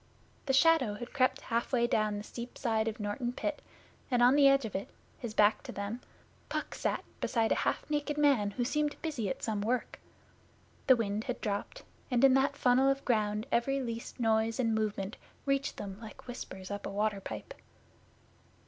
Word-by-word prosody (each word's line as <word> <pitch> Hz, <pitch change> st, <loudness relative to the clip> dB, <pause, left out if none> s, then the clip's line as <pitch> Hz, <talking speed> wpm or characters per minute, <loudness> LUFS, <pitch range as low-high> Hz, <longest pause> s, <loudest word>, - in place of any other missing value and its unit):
The 270 Hz, -, +2 dB
shadow 270 Hz, -7 st, +4 dB
had 240 Hz, +4 st, -8 dB
crept 260 Hz, -3 st, +2 dB
halfway 235 Hz, +1 st, 0 dB
down 215 Hz, -3 st, +1 dB
the 205 Hz, -, -5 dB
steep 235 Hz, +2 st, -8 dB
side 225 Hz, -3 st, 0 dB
of 225 Hz, +1 st, -3 dB
Norton 215 Hz, +4 st, -2 dB
Pit, 305 Hz, +3 st, -3 dB, 0.5 s
and 245 Hz, -2 st, +3 dB
on 250 Hz, +2 st, +7 dB
the 285 Hz, -1 st, +7 dB
edge 275 Hz, -2 st, +4 dB
of 215 Hz, -, -6 dB
it, 195 Hz, -, -3 dB, 0.3 s
his 230 Hz, -3 st, -6 dB
back 210 Hz, +1 st, +4 dB
to -, -, -8 dB
them, 200 Hz, +5 st, -4 dB, 0.5 s
Puck -, -, -3 dB
sat -, -, -1 dB, 0.2 s
beside 225 Hz, -2 st, +1 dB
a -, -, +2 dB
half -, -, -4 dB
naked 295 Hz, 0 st, -1 dB
man 275 Hz, -9 st, +4 dB
who 240 Hz, +4 st, -2 dB
seemed 300 Hz, +2 st, 0 dB
busy 285 Hz, -11 st, -2 dB
at 265 Hz, -, -4 dB
some 215 Hz, -3 st, -1 dB
work. 240 Hz, +4 st, -1 dB, 0.9 s
The 260 Hz, -, +8 dB
wind 215 Hz, -2 st, -2 dB
had 250 Hz, -, -3 dB
dropped, 205 Hz, -2 st, -3 dB, 0.3 s
and 250 Hz, -1 st, +2 dB
in 270 Hz, -1 st, +8 dB
that 275 Hz, +2 st, +2 dB
funnel 255 Hz, +2 st, +4 dB
of 275 Hz, 0 st, -1 dB
ground 215 Hz, -2 st, +1 dB
every 270 Hz, +4 st, +2 dB
least 235 Hz, -2 st, -5 dB
noise 225 Hz, 0 st, +2 dB
and 230 Hz, -3 st, +2 dB
movement 215 Hz, -1 st, -2 dB, 0.3 s
reached 275 Hz, 0 st, 0 dB
them 195 Hz, -1 st, -6 dB
like 220 Hz, -2 st, -11 dB
whispers 190 Hz, -6 st, -7 dB
up 205 Hz, 0 st, -4 dB
a -, -, -4 dB
water 205 Hz, 0 st, -1 dB
Pipe. -, -, -7 dB
235 Hz, 185 wpm, -31 LUFS, 215-270 Hz, 0.9 s, The